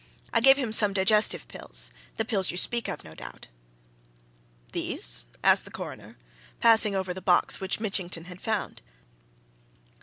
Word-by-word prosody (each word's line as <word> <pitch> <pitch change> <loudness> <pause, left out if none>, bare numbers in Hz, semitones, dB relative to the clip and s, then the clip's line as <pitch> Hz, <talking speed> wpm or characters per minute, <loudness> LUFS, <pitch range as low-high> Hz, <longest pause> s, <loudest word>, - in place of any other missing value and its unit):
I 230 - +2
gave 270 +2 +6
him 255 -6 -3
some 210 -2 +6
digestive 210 +3 +2
pills - - -6 0.3
the 225 - -2
pills 200 -5 +1
you 175 - -3
speak 235 +5 +2
of, - - -6
no 80 - -13
doubt." 80 - -12 1.2
"These?" - - 0 0.2
asked - - +4
the - - -11
Coroner, - - -10 0.4
passing 220 -3 +4
over 190 -1 -3
the 190 - -9
box 180 -1 +1
which 190 +1 -3
Mitchington 190 -6 -4
had 180 +1 -12
found. 220 -2 -4
195 Hz, 150 wpm, -26 LUFS, 180-225 Hz, 1.2 s, gave